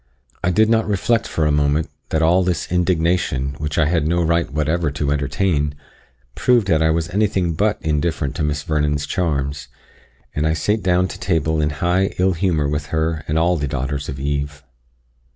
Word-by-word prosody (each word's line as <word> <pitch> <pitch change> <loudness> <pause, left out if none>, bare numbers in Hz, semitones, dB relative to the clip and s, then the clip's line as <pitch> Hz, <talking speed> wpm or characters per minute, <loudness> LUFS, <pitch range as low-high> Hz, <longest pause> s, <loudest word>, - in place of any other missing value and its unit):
I 90 - +2
did 110 +5 +3
not 115 -1 +2
reflect 105 +3 +1
for 80 - -1
a 75 - +3
moment, 75 +1 +1 0.2
that 80 0 +1
all 85 +3 +4
this 90 -4 -2
indignation, 85 -6 +1
which 75 -1 -3
I 80 - +4
had 80 -1 +1
no 85 +1 +1
right 85 -1 +1
whatever 75 +2 0
to 70 0 -2
entertain, 75 +1 0 0.6
proved 120 - +3
that 80 -1 +3
I 80 - +3
was 80 +1 0
anything 95 -4 +1
but 105 +5 +1
indifferent 75 -2 -1
to - - -1
Miss 75 0 -1
Vernon's 75 -2 0
charms; 75 -4 -2 0.7
and 75 +1 0
I 80 - +2
sate 105 +7 0
down 90 0 +2
to - - -8
table 80 -3 0
in 75 - +1
high 90 +6 0
ill 95 +1 +2
humour 80 -4 0
with 75 +1 -2
her 80 0 -1
and 75 - 0
all 85 +2 +2
the 70 -2 -2
daughters 70 +1 -3
of 70 -2 -5
Eve. 70 +1 -3
80 Hz, 190 wpm, -20 LUFS, 75-90 Hz, 0.7 s, all